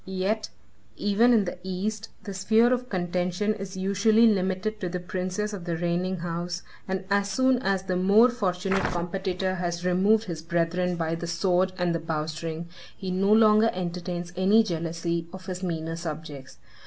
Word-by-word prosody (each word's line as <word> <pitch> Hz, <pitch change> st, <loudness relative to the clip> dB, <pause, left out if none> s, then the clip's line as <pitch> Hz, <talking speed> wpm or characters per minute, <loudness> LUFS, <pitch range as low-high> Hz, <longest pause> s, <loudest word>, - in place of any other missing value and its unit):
Yet, 190 Hz, +3 st, -2 dB, 0.5 s
even 210 Hz, +4 st, +3 dB
in 220 Hz, -4 st, +4 dB
the 175 Hz, -, -5 dB
East, 200 Hz, +4 st, -3 dB
the 200 Hz, -, -6 dB
sphere 220 Hz, +5 st, +3 dB
of 250 Hz, 0 st, -2 dB
contention 180 Hz, +2 st, 0 dB
is 195 Hz, -2 st, -7 dB
usually 200 Hz, +4 st, +3 dB
limited 195 Hz, 0 st, +1 dB
to 180 Hz, -, -2 dB
the 180 Hz, +1 st, -3 dB
princes 185 Hz, +3 st, -3 dB
of 185 Hz, -4 st, -6 dB
the 170 Hz, -2 st, -2 dB
reigning 175 Hz, +2 st, -1 dB
house, 175 Hz, +1 st, -3 dB, 0.2 s
and 190 Hz, 0 st, -2 dB
as 200 Hz, 0 st, +2 dB
soon 260 Hz, +4 st, +3 dB
as 195 Hz, -5 st, 0 dB
the 185 Hz, -1 st, -2 dB
more 200 Hz, +7 st, +5 dB
fortunate 195 Hz, -4 st, 0 dB
competitor 185 Hz, +2 st, -2 dB
has 175 Hz, 0 st, -3 dB
removed 200 Hz, +5 st, +3 dB
his 170 Hz, -7 st, -5 dB
brethren 170 Hz, +2 st, 0 dB
by 165 Hz, -1 st, -1 dB
the 170 Hz, +1 st, -4 dB
sword 180 Hz, +2 st, +1 dB
and 175 Hz, -2 st, +1 dB
the 165 Hz, -, -1 dB
bowstring, 160 Hz, +1 st, -4 dB, 0.3 s
he 190 Hz, -1 st, -4 dB
no 195 Hz, +2 st, +1 dB
longer 215 Hz, 0 st, +6 dB
entertains 175 Hz, -1 st, -4 dB
any 200 Hz, +5 st, +5 dB
jealousy 170 Hz, -2 st, -2 dB
of 185 Hz, -1 st, -10 dB
his 185 Hz, -1 st, -5 dB
meaner 165 Hz, -3 st, -3 dB
subjects. 155 Hz, -5 st, -7 dB
185 Hz, 165 wpm, -26 LUFS, 175-200 Hz, 0.5 s, longer